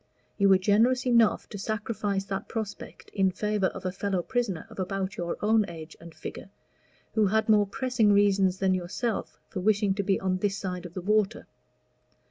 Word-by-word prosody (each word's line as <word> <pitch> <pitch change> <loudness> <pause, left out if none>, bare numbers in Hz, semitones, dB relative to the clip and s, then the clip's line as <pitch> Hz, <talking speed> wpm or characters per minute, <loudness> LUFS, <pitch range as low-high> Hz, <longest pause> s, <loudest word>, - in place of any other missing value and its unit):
You 200 0 +5
were 190 - +7
generous 225 +7 +3
enough 235 -3 +3
to 205 - -7
sacrifice 210 -1 -2
that 195 0 -4
prospect 220 -3 -6
in 195 -2 +3
favor 210 +1 0
of 195 0 -7
a 185 - 0
fellow 190 -1 -2
prisoner, 220 -8 -2
of - - -12
about 190 +1 -2
your 175 -1 -3
own 220 +1 +4
age 160 -1 -9
and 170 -1 -12
figure, - - -8 0.6
who 215 -2 +3
had 220 +3 +1
more 210 -2 +4
pressing 245 -1 +1
reasons 200 -2 +3
than 190 -1 +2
yourself 190 +6 -3
for - - -5
wishing 205 0 +2
to 200 - -1
be 195 -1 +1
on 185 -1 0
this 195 +1 -1
side 180 -2 -4
of 175 - -18
the 185 - -3
water. 210 +1 +1
200 Hz, 185 wpm, -27 LUFS, 190-215 Hz, 0.6 s, were